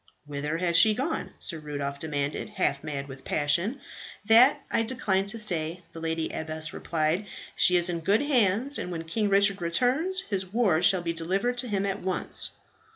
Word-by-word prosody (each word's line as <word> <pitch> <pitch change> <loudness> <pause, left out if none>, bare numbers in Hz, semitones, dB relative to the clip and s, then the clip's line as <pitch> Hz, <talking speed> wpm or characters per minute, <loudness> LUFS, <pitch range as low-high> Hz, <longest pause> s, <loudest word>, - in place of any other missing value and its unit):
"Whither 150 +2 -3
has 170 -1 +1
she 215 +4 +6
gone?" 280 +8 -2
Sir 165 -4 -5
Rudolph 145 -2 -5
demanded, 145 +3 -3
half 165 -9 0
mad 140 -2 -4
with 135 -1 -10
passion. 170 - 0 0.5
"That 250 +6 +6
I - - +2
decline 220 -5 0
to 220 +3 -3
say," 175 -5 -2
the 165 - -8
lady 160 0 -2
abbess 155 0 -4
replied. 165 +5 -1 0.3
"She 180 - +4
is 175 0 +1
in 175 -2 -2
good 200 +6 +2
hands; 255 0 +2
and 180 - -4
when 165 -1 -4
King 205 +6 -1
Richard 200 -1 +3
returns, 255 - +1
his 190 - -4
ward 200 -8 +2
shall 185 -3 +4
be 170 -1 -1
delivered 195 +9 -1
to 250 - -1
him 200 -3 -1
at 200 +1 -2
once." 185 -1 -1
180 Hz, 180 wpm, -27 LUFS, 160-220 Hz, 0.5 s, she